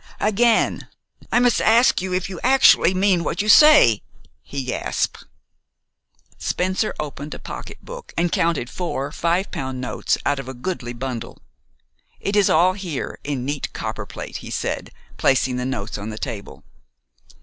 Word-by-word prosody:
"Again 220 Hz, +2 st, +2 dB, 0.4 s
I -, -, +3 dB
must 245 Hz, -1 st, +3 dB
ask 230 Hz, -2 st, +4 dB
you 185 Hz, 0 st, -4 dB
if 185 Hz, 0 st, -1 dB
you 185 Hz, -3 st, -7 dB
actually 260 Hz, -8 st, +5 dB
mean 185 Hz, -2 st, +2 dB
what -, -, -3 dB
you -, -, -5 dB
say?" 215 Hz, -, +7 dB, 0.4 s
he 140 Hz, -1 st, -5 dB
gasped. 125 Hz, -, -2 dB, 1.1 s
Spencer 185 Hz, +4 st, -1 dB
opened 150 Hz, 0 st, -5 dB
a -, -, -7 dB
pocketbook -, -, -9 dB
and 170 Hz, 0 st, +1 dB
counted 160 Hz, -5 st, +1 dB
four 145 Hz, -3 st, -4 dB
five 170 Hz, +5 st, 0 dB
pound 130 Hz, -1 st, -4 dB
notes 125 Hz, -, -1 dB
out 145 Hz, -, +1 dB
of 135 Hz, -, -7 dB
a 130 Hz, -, -7 dB
goodly 125 Hz, -3 st, -4 dB
bundle. 125 Hz, -1 st, -5 dB, 0.8 s
"It 200 Hz, -, -2 dB
is 205 Hz, -2 st, +4 dB
all 180 Hz, +4 st, +4 dB
here 180 Hz, -7 st, -5 dB
in 140 Hz, -3 st, -3 dB
neat 145 Hz, +1 st, -3 dB
copperplate," -, -, -6 dB
he -, -, -9 dB
said, -, -, -3 dB, 0.3 s
placing 130 Hz, -1 st, +2 dB
the 125 Hz, -, -2 dB
notes 110 Hz, -5 st, -4 dB
on 105 Hz, +2 st, -5 dB
the 110 Hz, -, -6 dB
table. 105 Hz, -2 st, -7 dB
165 Hz, 150 wpm, -22 LUFS, 130-195 Hz, 1.1 s, say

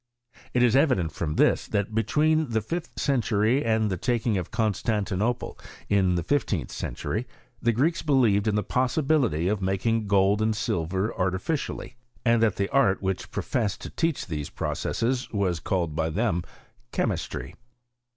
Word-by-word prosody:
It 125 Hz, -, +4 dB
is 120 Hz, 0 st, +4 dB
evident 130 Hz, -, +3 dB
from 75 Hz, 0 st, -3 dB
this, -, -, +3 dB
that 105 Hz, +1 st, -1 dB
between 150 Hz, +7 st, +2 dB
the 110 Hz, -1 st, 0 dB
fifth 165 Hz, +11 st, -4 dB
cen 135 Hz, -4 st, +1 dB
tury 110 Hz, +5 st, +2 dB
and 110 Hz, -2 st, +1 dB
the 95 Hz, -, -1 dB
taking 120 Hz, +1 st, 0 dB
of 90 Hz, -3 st, -2 dB
Constantinople 110 Hz, +1 st, -1 dB, 0.3 s
in 95 Hz, -3 st, +3 dB
the 85 Hz, -, -1 dB
fifteenth 95 Hz, -, 0 dB
century, 120 Hz, +3 st, -3 dB, 0.3 s
the 120 Hz, -, +3 dB
Greeks 145 Hz, +9 st, +1 dB
believed 115 Hz, -8 st, +3 dB
in 105 Hz, -, +2 dB
the 105 Hz, -, +1 dB
possibility 130 Hz, -, +1 dB
of 105 Hz, 0 st, 0 dB
making 105 Hz, +4 st, 0 dB
gold 100 Hz, +1 st, +3 dB
and 110 Hz, 0 st, +1 dB
silver 95 Hz, 0 st, -1 dB
artificially; 95 Hz, -, -2 dB, 0.3 s
and 115 Hz, -1 st, +4 dB
that 110 Hz, -3 st, +3 dB
the 100 Hz, -, 0 dB
art 100 Hz, -9 st, +2 dB
which 95 Hz, -1 st, -2 dB
professed 110 Hz, -4 st, -2 dB
to -, -, -7 dB
teach 165 Hz, -3 st, -1 dB
these 75 Hz, -4 st, -4 dB
processes 125 Hz, +2 st, -2 dB
was 95 Hz, -5 st, 0 dB
called 85 Hz, -1 st, -1 dB
by 80 Hz, 0 st, 0 dB
them 95 Hz, 0 st, 0 dB, 0.5 s
Chemistry. -, -, -2 dB
110 Hz, 155 wpm, -26 LUFS, 95-125 Hz, 0.5 s, It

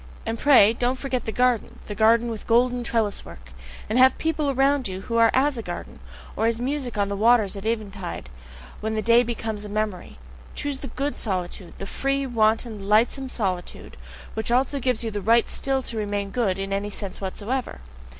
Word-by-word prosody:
And 225 Hz, 0 st, -3 dB
pray, 240 Hz, -7 st, +6 dB
don't 245 Hz, +2 st, 0 dB
forget 255 Hz, -2 st, -3 dB
the 220 Hz, -, -2 dB
garden, 250 Hz, -1 st, +1 dB
the 210 Hz, -, -5 dB
garden 230 Hz, +3 st, +4 dB
with 220 Hz, -, -7 dB
golden 245 Hz, +1 st, +3 dB
trellis 225 Hz, -3 st, 0 dB
work! 65 Hz, -1 st, -13 dB, 0.4 s
And 220 Hz, +4 st, +1 dB
have 260 Hz, 0 st, +6 dB
people 310 Hz, -2 st, 0 dB
around 275 Hz, -1 st, +2 dB
you 190 Hz, 0 st, -5 dB
who 230 Hz, +3 st, -2 dB
are 230 Hz, 0 st, +6 dB
as 270 Hz, -1 st, +2 dB
a -, -, -2 dB
garden -, -, -7 dB, 0.4 s
or 225 Hz, -, +1 dB
as 230 Hz, 0 st, 0 dB
music 255 Hz, -2 st, -2 dB
on 200 Hz, -1 st, +2 dB
the 200 Hz, -, -3 dB
waters 215 Hz, -1 st, +3 dB
at 200 Hz, +2 st, -5 dB
eventide, 200 Hz, -, -4 dB, 0.5 s
when 220 Hz, +1 st, -2 dB
already 215 Hz, -, 0 dB
the -, -, -15 dB
day 235 Hz, +1 st, +6 dB
becomes 225 Hz, -3 st, -4 dB
a 210 Hz, -, -7 dB
memory. 205 Hz, -, -3 dB, 0.4 s
Choose 285 Hz, -2 st, -3 dB
the 275 Hz, -, -7 dB
GOOD 275 Hz, +4 st, -3 dB
solitude, 185 Hz, -3 st, -4 dB
the 195 Hz, -, -6 dB
free, 275 Hz, +6 st, -1 dB
wanton, 220 Hz, -3 st, 0 dB
lightsome 240 Hz, +5 st, +2 dB
solitude, 185 Hz, -7 st, -3 dB, 0.4 s
which 220 Hz, 0 st, -2 dB
also 265 Hz, +3 st, +2 dB
gives 250 Hz, -3 st, 0 dB
you 225 Hz, -, -2 dB
the 205 Hz, -1 st, -3 dB
right 230 Hz, +4 st, +3 dB
still 270 Hz, -1 st, 0 dB
to 230 Hz, -, -6 dB
remain 205 Hz, -1 st, -2 dB
good 200 Hz, -5 st, 0 dB
in 195 Hz, 0 st, -3 dB
any 200 Hz, +1 st, -1 dB
sense 200 Hz, -2 st, -6 dB
whatsoever! 215 Hz, +6 st, -3 dB
225 Hz, 200 wpm, -24 LUFS, 205-250 Hz, 0.5 s, pray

